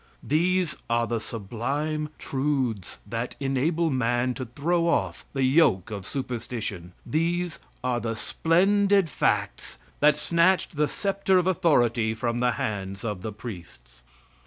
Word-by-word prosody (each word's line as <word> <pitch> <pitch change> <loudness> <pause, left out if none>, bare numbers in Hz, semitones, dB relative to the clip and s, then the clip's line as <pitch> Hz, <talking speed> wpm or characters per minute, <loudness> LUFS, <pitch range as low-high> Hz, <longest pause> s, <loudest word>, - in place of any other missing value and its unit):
These 175 +1 +1
are 115 0 +2
the 115 0 -1
sublime 140 +9 -3
truths 130 -8 -2
that 115 +3 -4
enable 150 +5 +1
man 125 0 +1
to 130 - -5
throw 170 +7 0
off 95 - 0
the 135 - 0
yoke 130 - +3
of 100 -2 -5
superstition. 115 -8 -4
These 170 +2 -1 0.2
are 125 -1 0
the 115 0 -3
splendid 195 - +2
facts - - -1 0.2
that 150 0 +5
snatched 170 +3 +2
the 150 0 +2
sceptre 195 0 +1
of 180 - +2
authority 120 -11 +2
from 120 +1 -1
the 125 0 +2
hands 100 -2 -4
of 105 -5 -3 0.2
priests. 70 - -10
130 Hz, 130 wpm, -26 LUFS, 115-165 Hz, 0.2 s, that